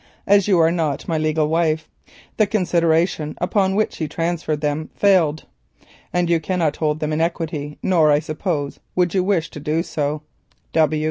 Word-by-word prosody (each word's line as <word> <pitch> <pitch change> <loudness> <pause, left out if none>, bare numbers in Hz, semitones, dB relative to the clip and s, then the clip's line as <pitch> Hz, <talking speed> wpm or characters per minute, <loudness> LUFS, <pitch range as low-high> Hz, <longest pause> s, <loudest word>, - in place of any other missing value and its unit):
As 200 -1 +4
you 195 -3 +4
are 165 0 +4
not 160 -5 -2
my 160 -2 0
legal 155 0 +1
wife 160 0 0 0.5
the 215 - +3
consideration 170 -5 +1
upon 190 +1 +1
which 215 +1 0
he 160 - -2
transferred 165 -2 -2
them 150 +1 -2
fails, 170 -7 +2 0.7
and 180 -1 +1
you 170 -1 +2
cannot 165 -2 -1
hold 155 -1 0
them 155 0 -1
in 155 - 0
equity, 160 -3 -3
nor 165 -5 +4
I 145 - +5
suppose 155 -1 -3 0.2
would 180 -2 +1
you 190 -2 +2
wish 185 -4 0
to - - -8
do 155 +3 -1
so. 150 -2 -3
160 Hz, 165 wpm, -21 LUFS, 155-180 Hz, 0.7 s, I